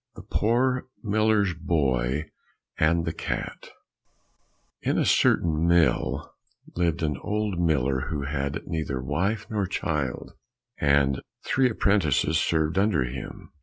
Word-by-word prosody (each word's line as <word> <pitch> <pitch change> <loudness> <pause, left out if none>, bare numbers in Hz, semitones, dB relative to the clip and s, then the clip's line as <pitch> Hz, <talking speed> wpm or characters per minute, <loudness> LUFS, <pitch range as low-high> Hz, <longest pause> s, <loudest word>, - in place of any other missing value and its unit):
106 - - -12
The - - -10
Poor 125 +4 +1
Miller's 105 -2 +2
Boy 75 -4 0 0.5
and 85 +2 +3
the 80 - -2
Cat - - -5 1.1
In - - 0
a - - +2
certain 80 0 +3
mill 80 -5 +2 0.4
lived 85 -1 0
an 75 -3 0
old 105 -1 -2
miller 70 -6 +1
who 75 -3 -2
had 70 +2 -3
neither 80 -5 -3
wife 95 - -1
nor 105 -3 0
child, 75 -8 -3 0.5
and 70 -2 +3 0.2
three 130 -1 +3
apprentices 80 - +2
served 80 +3 +1
under 100 -9 +2
him. 65 +2 -7
80 Hz, 125 wpm, -26 LUFS, 70-100 Hz, 1.1 s, and